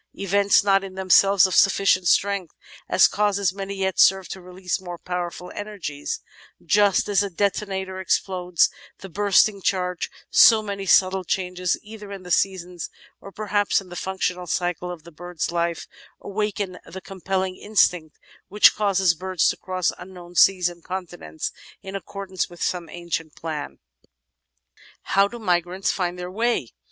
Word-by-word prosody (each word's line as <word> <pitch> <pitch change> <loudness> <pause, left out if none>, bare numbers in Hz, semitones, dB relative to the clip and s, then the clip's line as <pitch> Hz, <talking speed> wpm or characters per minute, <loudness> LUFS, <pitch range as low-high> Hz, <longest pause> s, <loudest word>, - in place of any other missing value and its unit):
Events 200 +1 +3
not 195 -1 +3
in 190 -1 -8
themselves 190 0 +5
of 185 - -1
sufficient 195 -2 +3
strength 200 -3 +1 0.3
as - - +6
causes 200 -3 0
may 195 0 -6
yet 190 -1 -2
serve 190 -1 +5
to 190 - -7
release 180 0 -4
more 175 -2 -7
powerful 180 0 -5
energies, 205 - -5 0.4
just 205 -2 +3
as 205 -1 +2
a 200 - -2
detonator 190 0 -2
explodes 180 -2 +1 0.3
the 195 - -9
bursting 200 +1 +3
charge: 180 -2 -1 0.2
so 220 -2 +7
many 200 -2 -5
subtle 185 +1 +4
changes, 180 0 -1
either 210 -1 -10
in 195 -2 -8
the 180 - -9
seasons 180 -2 -1 0.3
or 195 - -11
perhaps 205 0 0
in 190 -2 -12
the 175 - -9
functional 180 -1 -3
cycle 175 +1 -2
of 175 -3 -8
the 170 - -13
bird's 175 +1 -5
life, 170 -1 -1 0.3
awaken 200 -2 -3
the 190 - -9
compelling 190 0 -3
instinct 180 -7 +1 0.3
which 210 +2 +6
causes 195 -4 +2
birds 185 0 0
to - - -1
cross 185 -2 -1
unknown 180 -1 -11
seas 180 0 +5
and 175 -1 -8
continents 175 - -5 0.3
in 195 0 -7
accordance 195 -1 -4
with 175 -1 -7
some 175 -3 -2
ancient 170 -2 -5
plan. 155 -3 -6 1.3
How 195 +1 +3
do 240 - -9
Migrants 180 -2 0
Find 180 -2 -2
their 180 0 -6
Way? 225 - -1
185 Hz, 150 wpm, -23 LUFS, 180-200 Hz, 1.3 s, so